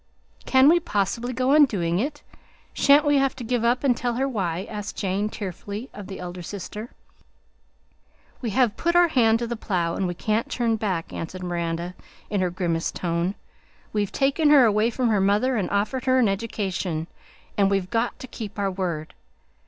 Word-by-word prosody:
"Can 265 +1 +6
we 340 +3 +6
possibly 230 - -1
go 255 +2 +1
on 300 -1 +8
doing 175 -8 -1
it? 290 +5 -3 0.5
Shan't 285 +1 +5
we 290 -1 +4
have 270 -1 +1
to 260 - -7
give 235 0 -1
up 240 +3 +2
and 260 -3 +3
tell 240 0 -2
her 265 +3 0
why?" 190 -7 -2
asked 210 -1 -6
Jane 200 +1 -1
tearfully 205 +4 -6
of 205 -2 -9
the 190 - -7
elder 180 0 -6
sister. 205 +5 -7 1.5
"We 240 - -2
have 230 0 +2
put 340 +1 0
our 350 -1 +6
hand 225 -6 +4
to 235 - -3
the 235 +1 -3
plough, 180 -7 -1
and 190 - -1
we 175 - -3
can't 215 +5 -1
turn 235 -2 0
back," 190 -6 -2
answered 185 +3 -6
Miranda 170 0 -3 0.4
in 205 -2 +1
her 180 - +1
grimmest 170 -2 -2
tone; 170 +2 -1 0.6
"we've 205 -2 0
taken 280 +3 +2
her 285 -4 +7
away 215 +1 +3
from 240 0 0
her 210 -3 +2
mother 210 +7 +2
and 205 -5 -1
offered 210 +6 -1
her 260 0 +4
an 250 -4 +4
education, 195 -5 -2 0.5
and 200 -1 +3
we've 195 -2 -1
got 235 +1 0
to - - -8
keep 220 -4 -8
our 200 -1 0
word. 175 -5 -3
210 Hz, 190 wpm, -24 LUFS, 185-250 Hz, 1.5 s, on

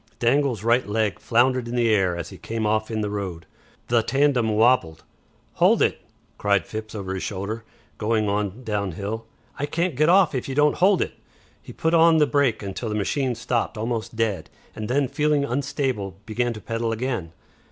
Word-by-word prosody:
Dangle's 125 -3 +1
right 120 +1 +2
leg 105 -3 0
floundered 125 +1 +2
in 120 - -4
the 115 -2 +3
air 95 -4 +2
as 85 -1 -5
he - - -12
came 110 -1 -3
off 110 0 0
in 110 -1 -2
the 105 - -1
road. 95 -5 -4 0.4
The 120 -1 +3
tandem 135 -2 +2
wobbled. 110 -7 +2 0.6
"Hold - - +5
it!" - - 0 0.4
cried 100 -3 +2
Phipps 110 0 -7
over 95 -2 -4
his 95 - -4
shoulder, 105 +3 -4 0.4
going 110 -1 +1
on 105 +3 -2
downhill. 105 +1 -3 0.3
"I 145 - -1
can't 170 +2 -1
get 155 +4 +3
off 185 -3 +5
if 130 0 -3
you 135 - -3
don't 150 +1 +3
hold 190 +1 +4
it." - - -7 0.5
He - - -11
put 160 +1 -1
on 165 -1 +6
the 150 - +5
brake 140 -7 +1
until 100 +4 -4
the 105 - -2
machine 125 +5 0
stopped 120 -1 -2
almost 115 0 -3
dead, 100 -8 -1 0.3
and 110 0 -5
then 135 +2 +2
feeling 150 +1 +1
unstable 125 -7 -2
began 120 +2 -1
to 105 - -9
pedal 115 +1 -2
again. 115 -7 -3
115 Hz, 185 wpm, -24 LUFS, 105-130 Hz, 0.6 s, on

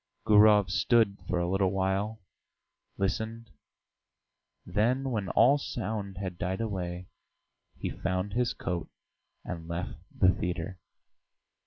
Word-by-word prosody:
Gurov 105 -2 +6
stood 110 -2 +3
for 90 - 0
a 85 0 0
little 95 +1 +2
while, 95 +3 -1 0.7
listened, 110 +3 -2 1.1
then, 125 +6 +1
when 105 -5 -2
all 140 +4 +5
sound 105 -6 -4
had 95 -2 -5
died 95 -1 -2
away, 90 -5 -3 0.7
he - - -3
found 95 +1 -2
his 125 +1 +1
coat 90 -2 -3 0.6
and 85 -2 -6
left 85 -5 -3 0.2
the 95 0 +4
theatre. 90 +1 -4
95 Hz, 115 wpm, -29 LUFS, 90-110 Hz, 1.1 s, Gurov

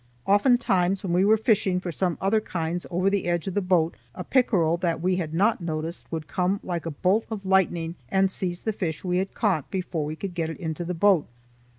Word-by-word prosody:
Oftentimes 195 -4 +3
when 180 -3 -1
we 180 +2 +4
were 215 +2 +5
fishing 205 -5 +2
for 180 -1 -4
some 175 +1 -1
other 215 +3 +2
kinds 170 -3 -3
over 180 +2 0
the 195 0 +1
edge 175 -2 0
of 195 - -3
the 205 - +1
boat, 175 -3 +2 0.2
a - - -5
pickerel 185 -11 +2
that 170 -2 -1
we 180 +2 +1
had 165 -4 -3
not 200 +6 +2
noticed 165 0 -5
would 160 -2 -4
come 185 +5 0
like 170 -2 -3
a 150 -3 -6
bolt 205 +5 +3
of 210 -3 -5
lightning 175 -3 +2 0.2
and 190 0 +2
seize 175 -2 -3
the 220 - -1
fish 160 -6 -3
we 180 -1 0
had 190 +1 -3
caught 185 - 0
before 180 -4 -2
we 150 +1 -4
could 190 +2 -5
get 165 -2 -2
it 160 - -6
into 160 -1 -4
the 175 +1 -3
boat. 185 -2 +3
180 Hz, 225 wpm, -25 LUFS, 165-195 Hz, 0.2 s, were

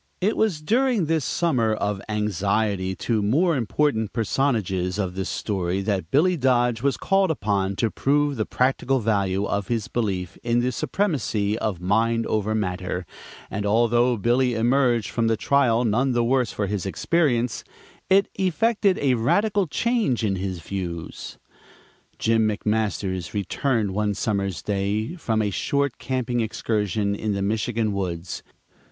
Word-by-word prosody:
It 200 +4 +1
was 185 -9 0
during 235 - +2
this 160 -1 0
summer 120 -9 +1
of 105 -2 -2
anxiety 100 -2 0
to 115 +3 -1
the - - +1
more 155 - +2
important 115 -2 0
personages 105 -6 0
of 95 -3 -2
this 95 0 -3
story 95 -2 -2
that 95 -5 -2
Billy 175 - +3
Dodge 120 -5 +2
was 140 0 +1
called 195 -1 +2
upon 100 -8 0
to 115 +1 0
prove 145 +1 +1
the 110 -3 -2
practical 130 +1 +1
value 100 -3 0
of 100 -1 -2
his 115 -4 -1
belief 95 -7 -3
in 120 0 +1
the 125 +1 0
supremacy 125 - -1
of 105 -5 -2
mind 115 +5 +1
over 110 0 0
matter, 90 -3 -2 0.5
and 105 - -2
although 120 +3 +3
Billy 120 +3 +2
emerged 120 -1 +2
from 115 -1 0
the 115 -1 +1
trial 125 -1 +2
none 125 +4 +1
the 120 -1 +2
worse 125 -1 +1
for 105 - -2
his 100 -1 -3
experience, 125 - 0 0.5
it 195 +1 +5
effected 200 +1 +2
a 135 -3 +2
radical 195 - +1
change 220 - 0
in 100 -3 0
his 95 -2 -4
views. 85 -2 -6 0.8
Jim 110 -1 +2
McMasters 105 -4 -2
returned 105 - 0
one 105 0 0
summer's 100 -6 -2
day 105 - -1
from 110 -9 0
a 105 - -1
short 140 +6 -1
camping 125 0 -2
excursion 105 -2 -1
in 105 +1 -2
the 100 0 -1
Michigan 110 +1 0
woods. 85 -3 -4
110 Hz, 150 wpm, -24 LUFS, 100-130 Hz, 0.8 s, it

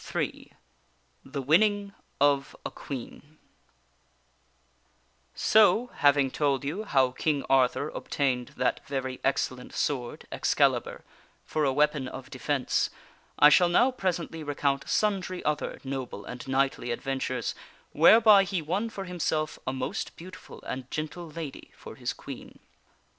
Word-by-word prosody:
PART - - -1
III - - -12 0.7
The 140 +1 -5
Winning 200 +7 +3 0.3
of 140 -1 +2
a - - -3
Queen 145 +3 -8 2.2
O, 220 +3 +5
having 140 -2 +4
told 140 -2 0
you 180 +10 -3
how 130 -8 +3
King 145 +2 -1
Arthur 135 +2 +3
obtained 130 -6 -1
that - - 0
very 130 -2 -3
excellent 130 -2 -1
sword, 125 -4 -2
Excalibur, - - +1 0.4
for 155 - -1
a 135 - +2
weapon 150 -1 +1
of 130 0 -9
defence, 135 0 0 0.5
I 150 - +8
shall 175 +3 +5
now 245 +9 +4
presently 175 -7 -3
recount 140 -2 -1
sundry 190 -4 0
other 150 -1 -1
noble 130 -6 -5
and 125 +1 -8
knightly 135 -2 0
adventures 130 +1 -2 0.4
whereby 210 +5 +7
he 185 -1 -2
won 185 +9 -2
for 200 -3 -6
himself 160 -4 -2
a - - +1
most 130 -1 -4
beauti 185 +2 -10
ful - - -13
and 130 0 -6
gentle 160 +2 -5
lady 155 -2 -7
for - - -10
his - - -3
Queen. - - -10
145 Hz, 130 wpm, -28 LUFS, 135-175 Hz, 2.2 s, I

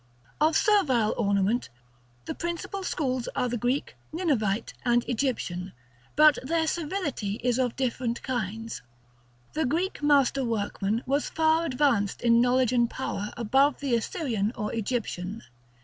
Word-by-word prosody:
Of 310 +1 +4
Servile 270 - +3
ornament, 200 - +1 0.6
the - - -3
principal 345 +3 -4
schools 260 -9 -2
are 250 -2 +1
the 245 - -2
Greek, 245 +4 -1 0.2
Ninevite, 240 - 0
and 240 -2 +3
Egyptian; 215 -8 -2 0.4
but 305 -1 +6
their 320 +4 0
servility 310 - -2
is 245 0 +1
of 250 -2 0
different 250 -2 -2
kinds. 225 -3 -3 0.7
The 315 -3 0
Greek 345 +7 -1
master 280 -2 +3
workman 215 -1 -1
was 280 +3 0
far 320 +1 +2
advanced 255 -9 +1
in 235 0 +5
knowledge 250 0 +3
and 240 -1 +3
power 210 -6 -4
above 265 +5 +3
the 275 -3 -1
Assyrian 230 - -1
or 210 - -3
Egyptian. 220 -3 -3
250 Hz, 135 wpm, -27 LUFS, 225-295 Hz, 0.7 s, but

